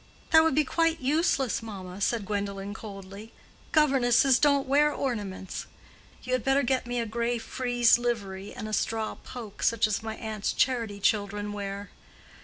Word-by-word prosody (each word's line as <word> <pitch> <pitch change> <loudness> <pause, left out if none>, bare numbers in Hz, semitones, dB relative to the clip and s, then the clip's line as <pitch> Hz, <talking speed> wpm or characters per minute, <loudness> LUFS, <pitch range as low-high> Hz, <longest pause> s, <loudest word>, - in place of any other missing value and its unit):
"That 320 -1 +8
would 320 -4 +2
be 305 - +4
quite 330 +2 +1
useless, 275 -2 +1
mamma," 195 -4 -8
said 220 0 0
Gwendolen, 200 0 -3
coldly. 200 0 -9 0.4
"Governesses 270 -4 +4
don't 280 -2 +3
wear 295 +2 +4
ornaments. 205 -9 -4 0.6
You 255 - -3
had 255 -3 +1
better 270 +1 +3
get 255 -1 0
me 245 0 -1
a 230 - -1
gray 235 +2 -1
frieze 240 +1 +2
livery 200 -5 -3
and 235 -4 -6
a 215 - -6
straw 220 0 -1
poke, 230 -5 -10
such 230 -1 +3
as 215 -1 -1
my 220 0 -5
aunt's 215 -2 -3
charity 230 -6 0
children 205 0 0
wear." 200 0 -5
230 Hz, 160 wpm, -28 LUFS, 205-260 Hz, 0.6 s, That